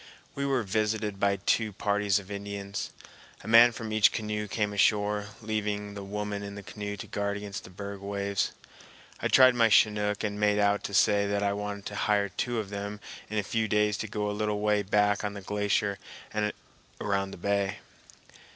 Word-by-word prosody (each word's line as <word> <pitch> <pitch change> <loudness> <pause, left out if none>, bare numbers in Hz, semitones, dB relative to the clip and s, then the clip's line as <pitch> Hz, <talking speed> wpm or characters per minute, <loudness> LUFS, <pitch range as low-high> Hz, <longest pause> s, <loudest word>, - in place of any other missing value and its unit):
We 140 0 -2
were 135 -3 +1
visited 105 0 -1
by 100 0 +3
two 105 +3 +1
parties 100 0 +1
of 100 0 -7
Indians. 100 0 -5 0.5
A - - -10
man 115 +2 +8
from 110 -1 -6
each 110 -1 +5
canoe 105 -1 -3
came 105 0 -1
ashore, 105 0 +2 0.2
leaving 105 -1 -2
the 100 -1 -7
women 105 0 -4
in 100 0 -7
the 100 - -8
canoe 100 +1 -6
to - - -7
guard 100 0 -2
against 100 -1 -6
the - - -11
berg 100 +2 -7
waves. 100 0 -1 0.7
I - - +1
tried 130 -1 +7
my 115 -2 +4
Chinook 105 -1 +3
and 105 -1 -2
made 105 0 +3
out 100 0 +2
to 100 - -3
say 100 -1 +4
that 100 0 0
I 100 0 +1
wanted 100 0 -5
to 105 - -5
hire 100 -1 +1
two 120 +5 -2
of 105 -3 -3
them 100 +1 -5 0.3
in 110 - -3
a 105 - +1
few 110 +2 -1
days 105 0 +2
to 110 - -4
go 105 0 -2
a - - -1
little 105 0 -1
way 105 0 +2
back 105 +1 +2
on 105 0 -3
the 100 - -6
glacier 105 0 0 0.3
and 105 0 0 0.5
around 100 -1 0
the - - -9
bay. 100 +2 0
105 Hz, 195 wpm, -28 LUFS, 100-105 Hz, 0.7 s, man